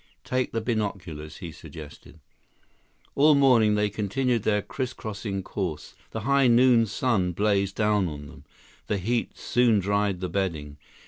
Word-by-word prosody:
Take 130 0 -1
the 115 - -2
binoculars," 100 -9 -4
he 85 -4 -7
suggested. 80 0 -12 0.9
All 150 +2 +5
morning 120 -6 +4
they 105 0 +2
continued 115 +4 0
their 105 0 +1
crisscrossing 110 -6 -5
course. 90 -8 -5 0.2
The 110 - -5
high 140 +2 +3
noon 120 -1 +5
sun 100 -7 0
blazed 100 0 +1
down 105 -3 +2
on 75 -2 -7
them. 70 - -13 0.4
The 105 - 0
heat 115 +5 -2
soon 120 -3 +2
dried 100 -1 0
the 90 - -3
bedding. 80 -6 -3
105 Hz, 140 wpm, -26 LUFS, 90-120 Hz, 0.9 s, All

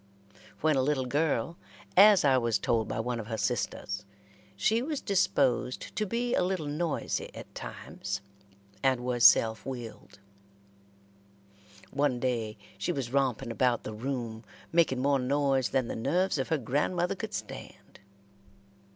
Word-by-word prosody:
When 155 -1 +3
a 135 - +3
little 135 -1 0
girl, 145 +2 0 0.4
as 200 -3 +7
I 135 -2 +5
was 115 -3 +2
told 115 -2 0
by - - -3
one 120 +1 -2
of 110 - -6
her 115 -1 -3
sisters, 100 0 -2 0.5
she 225 +2 +2
was 295 +2 -2
disposed 135 - 0
to 215 - -1
be 240 +4 -1
a - - +3
little 180 -3 -1
noisy 150 +2 -2
at - - -10
times, - - -6 0.6
and 130 -2 +2
was 125 -1 -1
self 110 -1 +6
willed. 120 -6 -8 1.7
One 140 -3 +1
day 115 -4 -1 0.2
she - - 0
was 135 -6 -4
romping 135 -3 0
about 120 0 +1
the 110 - -6
room, 115 -1 -4 0.3
making 155 -7 +2
more 140 -1 +3
noise 135 -2 +1
than 130 +2 0
the - - -4
nerves 165 +8 +1
of 130 - -1
her 160 - +1
grandmother 150 +8 0
could - - -5
stand. - - -9
135 Hz, 145 wpm, -29 LUFS, 120-155 Hz, 1.7 s, as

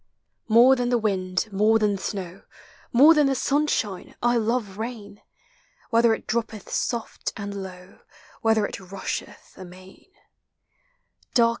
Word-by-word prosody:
More 240 +4 +6
than 245 -1 -1
the 245 - +3
wind, 190 -3 -1
more 215 +3 +4
than 210 -2 +1
the 190 - -8
snow, 190 -2 -5 0.5
More 285 +6 +7
than 300 -3 +3
the 270 - +1
sunshine, 270 -9 -1
I 240 0 +2
love 220 -3 -1
rain: 220 -3 -7 0.7
Whether 230 -1 +4
it - - -13
droppeth 225 -3 -3
soft 235 -3 -3
and 200 -1 -5
low, 185 0 -11 0.4
Whether 220 -2 +2
it - - -6
rusheth 195 0 -7
amain. 185 - -14
220 Hz, 130 wpm, -24 LUFS, 195-240 Hz, 0.7 s, More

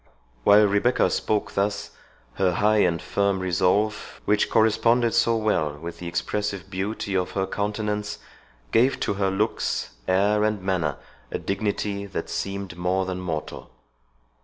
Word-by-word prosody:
While 105 +6 +7
Rebecca 100 +5 +2
spoke 105 -1 0
thus, 100 +1 -1 0.4
her 95 +3 +1
high 105 +4 +3
and 85 -4 +2
firm 100 +1 0
resolve, 95 +4 0
which 105 0 +2
corresponded 115 +2 +3
so 115 0 +3
well 80 -10 0
with 85 +3 -8
the 90 - -6
expressive 100 +2 -3
beauty 100 +1 -3
of 90 -1 0
her 95 -1 0
countenance, 105 +1 -2 0.5
gave 125 +4 +3
to - - 0
her 100 -1 0
looks, 105 +3 -1 0.2
air, 100 +3 +3
and 105 -1 +1
manner, 90 -7 -1 0.3
a - - -1
dignity 100 0 -2
that - - -5
seemed 100 -2 -4
more 90 +2 0
than 90 0 -4
mortal. 80 -4 -5
100 Hz, 140 wpm, -25 LUFS, 95-105 Hz, 0.5 s, While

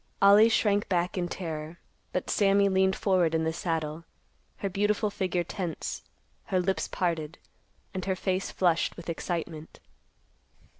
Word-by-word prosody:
Ollie 205 +3 +7
shrank 205 -2 +2
back 180 -1 0
in 180 -2 -1
terror, 160 -2 -5 0.3
but 180 - -2
Sammy 200 0 +4
leaned 190 0 +3
forward 180 -5 +2
in 160 - +1
the 160 0 0
saddle, 160 -2 -2 0.5
her 200 - -2
beautiful 205 +2 0
figure 185 -3 -1
tense, 170 -2 -4 0.4
her 185 - +1
lips 190 +1 0
parted, 165 -3 -2 0.6
and 185 -1 -4
her 190 -1 0
face 190 0 -1
flushed 175 -3 +1
with 170 -1 -5
excitement. 165 -2 -5
180 Hz, 140 wpm, -28 LUFS, 165-195 Hz, 0.6 s, Ollie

